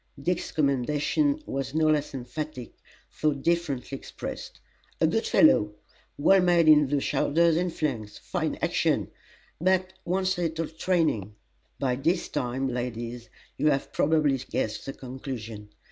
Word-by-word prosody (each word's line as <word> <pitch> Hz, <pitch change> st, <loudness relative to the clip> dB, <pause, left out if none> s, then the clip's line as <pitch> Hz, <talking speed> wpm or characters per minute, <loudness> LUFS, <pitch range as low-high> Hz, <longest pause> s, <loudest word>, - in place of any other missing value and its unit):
Dick's 175 Hz, +5 st, -1 dB
commendation 150 Hz, -, +1 dB
was 135 Hz, +1 st, -4 dB
no 160 Hz, 0 st, +3 dB
less 150 Hz, -1 st, +2 dB
emphatic 130 Hz, +1 st, -6 dB, 0.5 s
though 155 Hz, -1 st, +3 dB
differently 140 Hz, -3 st, -1 dB
expressed: -, -, -7 dB, 0.4 s
"A -, -, +4 dB
good -, -, +1 dB
fellow! 105 Hz, 0 st, +4 dB, 0.4 s
well 190 Hz, +6 st, +5 dB
made 175 Hz, -2 st, +4 dB
in 150 Hz, -2 st, +7 dB
the 145 Hz, +1 st, +1 dB
shoulders 165 Hz, +4 st, +2 dB
and 175 Hz, +1 st, 0 dB
flanks: 115 Hz, -10 st, -3 dB
fine -, -, -2 dB
action, -, -, +1 dB, 0.5 s
but 185 Hz, +2 st, +1 dB
wants 185 Hz, +1 st, 0 dB
a -, -, -1 dB
little 165 Hz, -1 st, -2 dB
training!" 160 Hz, -, 0 dB, 0.4 s
By 125 Hz, -2 st, 0 dB
this 165 Hz, +6 st, 0 dB
time, 135 Hz, -1 st, -2 dB
ladies, 120 Hz, -1 st, -4 dB, 0.3 s
you 150 Hz, -, +1 dB
have 140 Hz, -1 st, -1 dB
probably 150 Hz, -3 st, +2 dB
guessed 110 Hz, -1 st, -3 dB
the 135 Hz, -, -4 dB
conclusion. 120 Hz, -5 st, -7 dB
145 Hz, 135 wpm, -27 LUFS, 125-165 Hz, 0.5 s, in